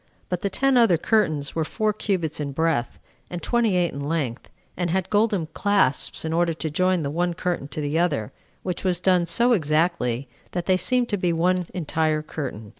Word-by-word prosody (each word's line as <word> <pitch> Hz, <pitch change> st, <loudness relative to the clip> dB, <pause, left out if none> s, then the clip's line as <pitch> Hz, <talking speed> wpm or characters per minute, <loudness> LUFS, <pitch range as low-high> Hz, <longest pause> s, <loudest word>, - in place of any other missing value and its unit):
But 180 Hz, -1 st, -2 dB
the 200 Hz, -, 0 dB
ten 265 Hz, +7 st, +2 dB
other 225 Hz, -8 st, +5 dB
curtains 155 Hz, -8 st, +1 dB
were 160 Hz, -, 0 dB
four 215 Hz, +6 st, -1 dB
cubits 180 Hz, -8 st, -2 dB
in 140 Hz, -2 st, -3 dB
breadth, 160 Hz, -6 st, 0 dB, 0.3 s
and 175 Hz, -, -4 dB
twenty 230 Hz, -1 st, +1 dB
eight 175 Hz, -1 st, +1 dB
in 140 Hz, -, -6 dB
length; 140 Hz, -5 st, -3 dB, 0.3 s
and 175 Hz, -1 st, -1 dB
had 185 Hz, +2 st, -1 dB
golden 205 Hz, -5 st, +2 dB
clasps, 200 Hz, -9 st, +1 dB
in 160 Hz, -, -2 dB
order 170 Hz, -1 st, +1 dB
to 160 Hz, -1 st, -3 dB
join 185 Hz, +1 st, +1 dB
the 140 Hz, -, -2 dB
one 175 Hz, +2 st, 0 dB
curtain 175 Hz, -5 st, -2 dB
to 150 Hz, -, -5 dB
the 145 Hz, +2 st, 0 dB
other, 145 Hz, -11 st, 0 dB, 0.3 s
which 180 Hz, -2 st, -4 dB
was 180 Hz, -2 st, +1 dB
done 180 Hz, -2 st, +3 dB
so 235 Hz, +9 st, +3 dB
exactly 155 Hz, -, +1 dB, 0.3 s
that 175 Hz, -1 st, -2 dB
they 185 Hz, -, +3 dB
seemed 245 Hz, +7 st, +1 dB
to 205 Hz, -, 0 dB
be 180 Hz, -2 st, +1 dB
one 180 Hz, +1 st, +1 dB
entire 155 Hz, -2 st, 0 dB
curtain. 125 Hz, -9 st, -6 dB
170 Hz, 195 wpm, -24 LUFS, 155-185 Hz, 0.3 s, other